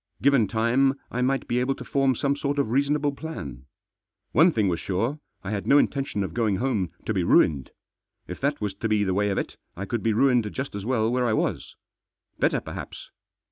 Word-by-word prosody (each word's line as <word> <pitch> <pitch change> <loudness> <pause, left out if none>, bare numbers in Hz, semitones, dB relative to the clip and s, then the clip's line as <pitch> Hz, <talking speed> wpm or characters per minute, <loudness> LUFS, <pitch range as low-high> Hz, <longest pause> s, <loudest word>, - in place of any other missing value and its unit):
Given 135 -6 +4
time 120 +6 +2 0.2
I 125 - -2
might 135 +2 0
be 120 - +1
able 130 +2 0
to - - -9
form 135 -2 +2
some 140 +4 0
sort 145 0 -2
of 140 -6 0
reasonable 145 +2 +1
plan. 75 - -7 0.7
One 170 +3 +5
thing 110 -8 +1
was 85 -3 0
sure, 115 +11 -2 0.2
I 100 - -4
had 100 -2 -3
no 140 - +6
intention 135 -8 0
of 95 - -5
going 110 -4 +1
home 110 -6 0 0.2
to - - -1
be - - 0
ruined. 70 -4 +3 0.6
If 90 - -7
that 140 +2 0
was 105 -2 -2
to 105 +3 -3
be 105 -1 +2
the 95 -2 0
way 105 +2 +1
of 100 - -1
it, - - -3 0.2
I 100 - -4
could 115 +3 -2
be 115 - +1
ruined 120 -2 +3
just 135 +1 -4
as 100 +1 -5
well 115 -3 +1
where 125 0 +1
I 110 - +1
was. - - -2 0.6
Better - - +2
perhaps. - - -8
120 Hz, 215 wpm, -25 LUFS, 105-135 Hz, 0.7 s, no